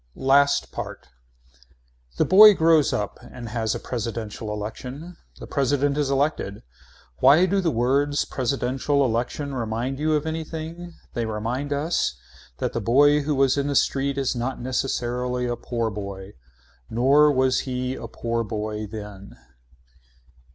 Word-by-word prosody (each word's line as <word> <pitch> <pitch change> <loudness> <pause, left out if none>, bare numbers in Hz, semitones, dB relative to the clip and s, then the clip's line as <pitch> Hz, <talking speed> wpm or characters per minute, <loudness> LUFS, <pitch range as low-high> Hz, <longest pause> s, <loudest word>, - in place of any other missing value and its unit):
LAST 140 +1 +3
PART - - -7 1.1
The - - +3
boy 210 +2 +9
grows 160 -4 +4
up 105 -1 -3
and 120 -2 -9
has 110 -1 -1
a - - -4
presidential 115 -2 -5
election. 125 +10 -7 0.2
The - - -9
president 140 0 0
is 145 -2 0
elected. 140 -7 -1 0.6
Why 145 +7 +6
do 195 +1 +1
the 175 - +1
words 140 +4 +1
presidential 135 +2 0
election 125 +4 -2
remind 120 +2 -3
you 155 +1 +1
of 150 0 -1
anything. 160 +2 -6 0.2
They 115 -2 -2
remind 115 +6 -3
us 150 +4 0 0.4
that - - -2
the - - -2
boy 145 +5 +4
who 145 +1 -1
was 135 0 +3
in 140 - -1
the 145 - -1
street 140 +1 +1
is 135 -2 0
not 125 +2 -3
necessarily 125 -1 -2
a 120 0 -1
poor 115 -2 -3
boy. 100 -1 -7 0.6
Nor 140 +6 +4
was 130 -1 +2
he 125 0 -2
a 115 - -7
poor 115 0 -2
boy 105 -1 -4
then. 105 -2 -9
130 Hz, 145 wpm, -24 LUFS, 115-145 Hz, 1.1 s, boy